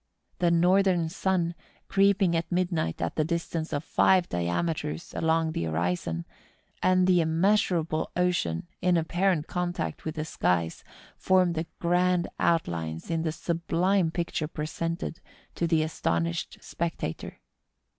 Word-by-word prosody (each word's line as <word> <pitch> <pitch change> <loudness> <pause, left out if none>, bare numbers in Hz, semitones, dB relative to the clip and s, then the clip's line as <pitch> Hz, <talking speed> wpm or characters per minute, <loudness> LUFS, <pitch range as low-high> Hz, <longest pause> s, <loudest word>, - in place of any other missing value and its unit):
The 175 - +3
northern 175 0 +3
sun, 180 -1 0 0.3
creeping 195 -2 +3
at 165 +2 -2
midnight 175 - 0
at 85 - -3
the 155 - +3
distance 165 0 -2
of 145 -1 -2
five 185 +1 +3
diameters 150 - -2
along 160 0 +1
the 85 - -2
horizon, 85 0 -1 0.6
and 185 0 +4
the 180 -2 +4
immeasurable 165 -1 +1
ocean 175 - 0
in 180 -1 +3
apparent 175 0 +1
contact 175 - -3
with 155 0 -4
the 155 -1 -3
skies, 85 - 0 0.3
form 185 -2 +3
the 160 0 -3
grand 180 0 +2
outlines 85 - -1
in 165 -1 0
the 160 -1 -1
sublime 170 +2 +1
picture 165 -2 -2
presented 165 +2 -4 0.3
to 170 - -1
the 160 -2 +3
astonished 85 - -2
spectator. 165 - -4
165 Hz, 125 wpm, -27 LUFS, 155-180 Hz, 0.6 s, and